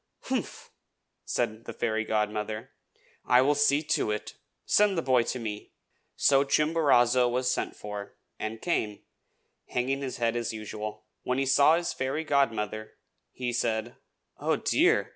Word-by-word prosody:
"Humph!" - - -4 0.5
said 110 +2 -2
the - - -6
fairy 110 -1 -1
godmother. 110 +2 -2 0.5
"I 125 +1 +5
will 145 +2 +3
see 145 +1 +3
to 155 -7 0
it. 105 0 -3 0.3
Send 205 -3 +3
the 165 - 0
boy 130 -2 +4
to - - -2
me!" 105 -3 -6 0.4
So 140 -1 +4
Chimborazo 140 -5 +3
was 125 +1 0
sent - - -2
for, 105 -1 -7 0.2
and 110 +1 -5
came, 110 -12 -1 0.6
hanging 135 +3 -1
his 135 -2 -4
head 115 -1 0
as 120 -1 -2
usual. 110 0 -6 0.2
When 125 - -1
he 135 - +1
saw 140 +4 +5
his 170 0 -2
fairy 135 +4 -2
godmother, 110 -7 0 0.4
he 125 -1 -3
said, 115 -1 -1 0.4
"Oh, - - +1
dear!" - - +2
120 Hz, 145 wpm, -28 LUFS, 110-140 Hz, 0.6 s, I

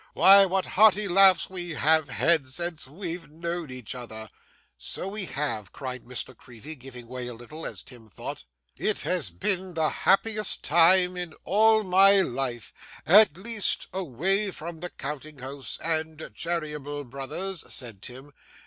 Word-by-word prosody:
Why, 195 0 +8
what 190 +1 -1
hearty 210 0 +4
laughs 190 0 +6
we 175 -3 -5
have 155 0 +3
had 160 0 +2
since 165 +2 -4
we've 165 +1 -7
known 170 0 -5
each 130 -3 -7
other!' 110 -3 -7 0.4
'So - - -5
we 200 0 -4
have,' 125 - -3
cried 130 -3 -7
Miss 125 0 -4
La 130 - -13
Creevy 125 +5 -10
giving 125 -3 -11
way 125 0 -7
a 120 - -7
little, 150 +8 -7
as - - -7
Tim 115 -4 -13
thought. 90 - -7 0.3
'It - - 0
has - - -1
been 185 - -2
the 160 -2 +2
happiest 215 +1 +1
time 180 +3 +5
in 175 -3 -6
all 220 +2 +3
my 195 +1 +6
life; 125 - -3 0.3
at 195 -3 +6
least, 215 +1 0
away 190 - -1
from 170 -2 -8
the 180 +2 -6
counting 150 0 -6
house 135 +1 -5
and 160 -1 -2
Cheeryble 150 -4 -4
Brothers,' 140 +8 -6
said 115 -7 -3
Tim. 130 +5 -9
160 Hz, 155 wpm, -26 LUFS, 130-185 Hz, 0.4 s, Why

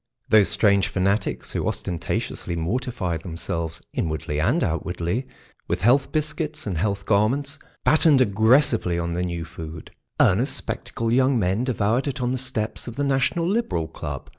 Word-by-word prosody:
Those 105 -3 +6
strange 100 -2 +3
fanatics 100 +1 -1
who - - -2
ostentatiously 85 0 -3
mortify 90 0 -2
themselves, 85 -1 -4
inwardly 75 -2 -2
and 120 - +2
outwardly, 90 - -2 0.4
with - - -1
health 135 +5 +4
biscuits 155 0 -2
and 100 -4 -2
health 100 +1 -1
garments, 135 +9 +1 0.2
battened 155 -2 +5
aggressively 110 - +3
on 85 0 -2
the 90 - -1
new 85 -2 -3
food. 80 -1 -9 0.3
Earnest, - - +3
spectacled 115 0 -3
young 130 +1 +3
men 100 +4 +1
devoured 120 +1 0
it 140 0 -3
on 125 -1 0
the 130 - -1
steps 125 -4 -2
of 120 - -6
the 145 - -1
National 140 +5 +1
Liberal 180 - 0
Club. - - -6
105 Hz, 150 wpm, -24 LUFS, 85-130 Hz, 0.4 s, Those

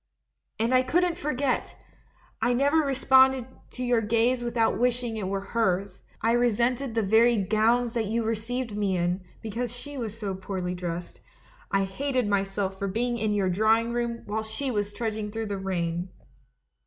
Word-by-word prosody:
"And 230 +3 +1
I 255 - +6
couldn't 345 +6 +1
forget! 280 -5 -1 0.6
I 245 - +3
never 280 +5 +3
responded 265 -3 +4 0.3
to 255 - -4
your 245 -2 +2
gaze 235 +3 +2
without 235 -1 +1
wishing 245 -1 0
it 210 -4 -3
were 195 0 -2
hers. 195 -4 0 0.2
I 225 - +3
re 240 +1 +4
sented 240 +2 0
the 225 - +2
very 225 +4 +4
gowns 225 +4 +2
that 225 -3 -1
you 230 +2 0
received 225 +1 -2
me 200 -3 0
in, 175 +2 -1 0.2
because 225 +2 -3
slie 275 +3 -6
was 225 -1 -5 0.2
poorly 185 -2 -3
dressed. 175 -1 -5 0.5
I 195 0 +2
hated 255 +5 -1
myself 195 -1 -1
for 200 - -1
being 235 +4 -1
in 215 -1 0
your 190 -2 +1
drawing 220 +4 +2
room 235 -1 -2
while 215 +2 -2
she 235 +5 -3
was 205 -2 -1
trudging 215 -1 -3
through 225 +1 -4
the 200 -2 -3
rain. 175 -2 -2
225 Hz, 165 wpm, -27 LUFS, 200-245 Hz, 0.6 s, I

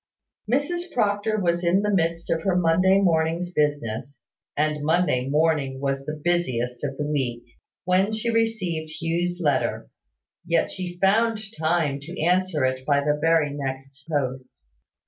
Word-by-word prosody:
Mrs 345 +7 0
Proctor 215 -1 0
was 175 -2 0
in 180 +4 +3
the 210 0 +1
midst 170 -2 0
of 165 - +1
her 190 +1 +1
Monday 180 +3 +4
morning's 170 -1 +1
business 140 -3 -1 0.4
(and 150 0 0
Monday 155 -5 +1
morning 150 -3 +1
was 135 0 -2
the 150 0 -4
busiest 125 -9 -1
of 135 -2 -3
the 150 - -2
week), 130 -5 -2 0.4
when 185 +3 +2
she 220 +2 -1
received 200 -9 -1
Hugh's 175 +2 -1
letter. 140 - 0 0.5
Yet 170 -1 +1
she 180 -2 -6
found 215 +4 +2 0.2
time 155 -3 0
to 170 +6 -9
answer 175 -3 +2
it 130 0 -1
by 140 0 +2
the 150 +1 +1
very 160 -2 +3
next 135 0 -6
post. 130 -3 -3
165 Hz, 145 wpm, -24 LUFS, 140-180 Hz, 0.5 s, Monday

